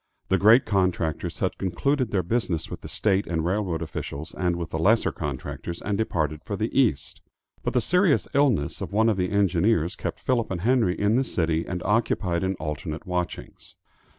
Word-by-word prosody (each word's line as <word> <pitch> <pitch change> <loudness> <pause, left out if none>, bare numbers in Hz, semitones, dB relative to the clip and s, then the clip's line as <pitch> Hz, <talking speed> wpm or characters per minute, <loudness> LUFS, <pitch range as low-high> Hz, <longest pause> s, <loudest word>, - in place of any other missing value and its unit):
The 95 - +3
great 110 +5 +6
contractors 90 -6 0
had - - -1
concluded 130 +7 0
their 95 -3 0
business 90 -5 -1
with - - -6
the - - -8
state 100 -1 0
and 80 -2 -1
railroad 90 -3 -1
officials 80 -1 -6
and 90 -1 0
with 85 -1 -5
the 80 - -2
lesser 110 +8 +3
contractors, 75 +3 -5
and 105 - -2
departed 80 -8 -1
for 100 - -4
the 110 +3 -3
East. 120 - +1 0.4
But - - -3
the 125 - +4
serious 180 - +2
illness 130 - +2
of - - -4
one 110 +2 +4
of 105 - +1
the 90 -1 0
engineers 95 -2 +2
kept - - -5
Philip 120 -3 0
and 90 -3 -3
Henry 115 -4 +2
in 105 +3 +3
the 135 - +3
city 80 -8 -1
and 90 -1 -4
occupied 100 -5 +1
in 95 +1 0
alternate 75 0 -5
watchings. 90 -2 -5
95 Hz, 185 wpm, -25 LUFS, 85-110 Hz, 0.4 s, great